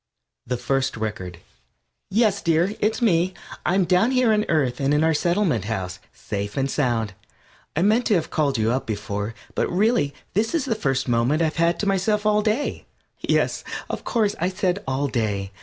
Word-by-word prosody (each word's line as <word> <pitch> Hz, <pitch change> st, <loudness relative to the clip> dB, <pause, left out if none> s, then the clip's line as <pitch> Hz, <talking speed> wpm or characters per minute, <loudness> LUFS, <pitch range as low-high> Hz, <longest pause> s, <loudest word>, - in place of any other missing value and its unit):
THE 125 Hz, +1 st, -1 dB
FIRST 135 Hz, +1 st, -1 dB
RECORD 100 Hz, -5 st, -4 dB, 0.7 s
Yes, 210 Hz, -1 st, +2 dB
dear, 170 Hz, +4 st, +2 dB
it's 220 Hz, +3 st, 0 dB
me. 180 Hz, -3 st, +2 dB, 0.3 s
I'm 185 Hz, +1 st, +2 dB
down 180 Hz, +7 st, +3 dB
here 250 Hz, -4 st, +3 dB
on 210 Hz, -, +3 dB
the 210 Hz, -, -2 dB
Earth 135 Hz, -6 st, +1 dB
and 140 Hz, +1 st, +2 dB
in 150 Hz, -, +3 dB
our 160 Hz, 0 st, +3 dB
Settlement 170 Hz, -, +1 dB
House, 95 Hz, -4 st, -3 dB
safe 100 Hz, 0 st, -5 dB
and 135 Hz, 0 st, 0 dB
sound. 115 Hz, -8 st, 0 dB, 0.6 s
I 165 Hz, -, +2 dB
meant 220 Hz, +4 st, +3 dB
to 210 Hz, -, +4 dB
have 165 Hz, -, -1 dB
called 140 Hz, -4 st, +1 dB
you 110 Hz, +1 st, +1 dB
up 130 Hz, +2 st, -1 dB
before, 105 Hz, 0 st, -3 dB, 0.2 s
but -, -, 0 dB
really 195 Hz, -, +2 dB, 0.2 s
this 220 Hz, -, +1 dB
is 320 Hz, -, 0 dB
the 250 Hz, -, +1 dB
first 135 Hz, -11 st, -1 dB
moment 125 Hz, +7 st, +2 dB
I 160 Hz, 0 st, +1 dB
have -, -, -13 dB
had 170 Hz, 0 st, +2 dB
to -, -, -1 dB
myself 205 Hz, +2 st, +1 dB
all 210 Hz, 0 st, +4 dB
day. 220 Hz, +6 st, -1 dB, 0.3 s
Yes, -, -, 0 dB, 0.3 s
of -, -, -4 dB
course, 215 Hz, -4 st, +1 dB
I 175 Hz, +3 st, +1 dB
said 190 Hz, 0 st, -1 dB
"all 135 Hz, +2 st, 0 dB
day." 105 Hz, -6 st, -2 dB
160 Hz, 190 wpm, -23 LUFS, -, 0.7 s, to